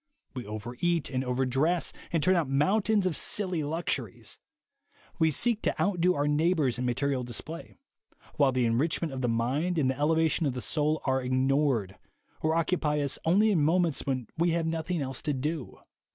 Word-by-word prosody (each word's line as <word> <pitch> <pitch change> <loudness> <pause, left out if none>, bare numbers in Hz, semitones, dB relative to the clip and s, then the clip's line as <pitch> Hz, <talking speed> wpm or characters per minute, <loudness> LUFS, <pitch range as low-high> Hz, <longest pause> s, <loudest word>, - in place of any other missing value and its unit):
We 125 -5 -6
over 110 +3 -6
eat 170 -4 0
and 130 -1 -1
over 125 +1 0
dress 155 +7 +1 0.2
and 165 -3 0
turn 185 +4 +4
out 165 -6 0
mountains 195 +8 +2
of 180 -4 0
silly 185 -5 0
luxuries; 160 +4 -4 0.8
we 160 -1 +4
seek 225 - +1
to - - -1
outdo 180 -2 +2
our 145 +1 0
neighbors 150 -4 +1
in 125 - -1
material 130 +1 0
display; 140 +8 -5 0.6
while 140 -2 +4
the 125 -1 +1
enrichment 145 +6 0
of 130 - -4
the 125 - 0
mind 135 +10 0
and 135 -4 +2
the 130 - -7
elevation 160 +1 +2
of 130 - -2
the - - -3
soul 150 - 0
are 130 0 +1
ignored, 130 -6 +1 0.4
or 160 +1 +1
occupy 160 -3 +1
us 140 -2 -1
only 205 +6 +4
in 175 -6 +2
moments 165 0 +2
when 130 -3 -2
we 170 +2 +2
have 165 - -1
nothing 160 0 -2
else 130 -1 -5
to 150 - -1
do. 145 +1 -4
150 Hz, 180 wpm, -28 LUFS, 130-170 Hz, 0.8 s, turn